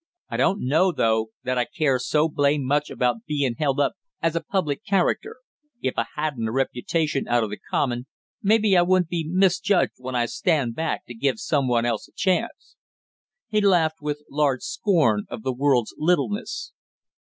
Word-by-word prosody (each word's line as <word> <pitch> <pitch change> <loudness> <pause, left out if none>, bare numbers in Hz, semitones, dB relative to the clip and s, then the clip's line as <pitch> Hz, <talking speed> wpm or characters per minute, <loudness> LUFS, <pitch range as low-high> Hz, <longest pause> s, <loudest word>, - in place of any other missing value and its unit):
I - - -3
don't 195 -5 +1
know, 165 +7 +3
though, 110 -6 +1
that 130 0 0
I 120 - +1
care 135 -4 0
so 150 +5 +2
blame 145 -2 +1
much 145 +3 +1
about 120 -2 -1
being 145 -5 0
held 140 -2 +1
up 145 - +2 0.3
as 165 0 0
a 165 - 0
public 165 0 -2
character; 195 -4 0 0.4
if 130 - -1
I 115 - -1
hadn't 145 -7 -2
a - - -3
reputation 135 +4 -1
out 120 -1 +2
of 105 - -4
the 105 - -6
common, 125 -1 -1 0.3
maybe 215 -1 +3
I 175 - +6
wouldn't 180 -1 +2
be 165 -3 -2
misjudged 190 +1 +2
when 130 0 -6
I 120 -1 +2
stand 140 -2 0
back 160 +6 -3
to 120 - -9
give 135 - 0
some 145 -10 0
one 120 -1 +2
else 120 - -2
a - - -27
chance!" 195 +5 -1 0.7
He 215 -1 +1
laughed 165 -6 +2
with 150 0 -3
large 140 -3 0
scorn 170 - +1
of 110 - -7
the 130 - -1
world's 130 -3 +1
littleness. 180 +6 -1
150 Hz, 180 wpm, -24 LUFS, 125-175 Hz, 0.7 s, I